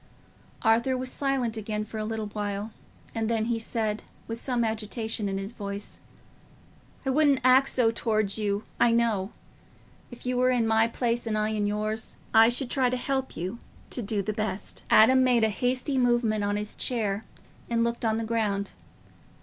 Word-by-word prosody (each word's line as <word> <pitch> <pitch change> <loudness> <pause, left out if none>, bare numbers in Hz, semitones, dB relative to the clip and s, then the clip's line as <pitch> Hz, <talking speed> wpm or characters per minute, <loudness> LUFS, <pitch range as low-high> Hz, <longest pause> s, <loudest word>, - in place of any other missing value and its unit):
Arthur 235 +3 +3
was 255 0 -4
silent 270 -5 -1
again 215 0 -3
for 220 0 -6
a 215 - -2
little 220 0 -3
while, 205 0 -4 0.4
and 225 -1 -1
then 225 -1 +1
said, 220 -2 -2 0.3
with 230 0 -5
some 245 -3 0
agitation 220 -1 -2
in 195 - -2
his 195 +2 -5
voice, 200 -3 -7 1.1
"I 265 - +1
wouldn't 285 -1 +4
act 255 +2 +6
so 235 -3 +3
towards 215 -3 0
you, 205 0 -1 0.2
I 240 - +5
know. 225 -4 +1 0.8
If 240 - -12
you 250 0 0
were 255 0 +4
in 245 -3 +2
my 225 0 +4
place 235 0 -1
and 215 -1 0
I 215 0 +1
in 210 -1 0
yours, 215 +1 -2 0.2
I 225 +1 +8
should 245 +1 0
try 260 -2 +2
to 255 - -1
help 265 +1 -2
you 185 +8 -4 0.3
to 245 - -1
do 205 -1 -1
the 215 - -2
best." 215 -2 -4
Adam 260 +4 +6
made 245 -3 +3
a 220 - +4
hasty 255 +5 0
movement 240 -4 +2
on 205 0 0
his 210 0 -4
chair 215 -4 -1 0.5
and 230 -1 +2
looked 235 0 -2
on 220 -1 +1
the 225 - -2
ground. 215 -3 -1
225 Hz, 180 wpm, -27 LUFS, 215-245 Hz, 1.1 s, I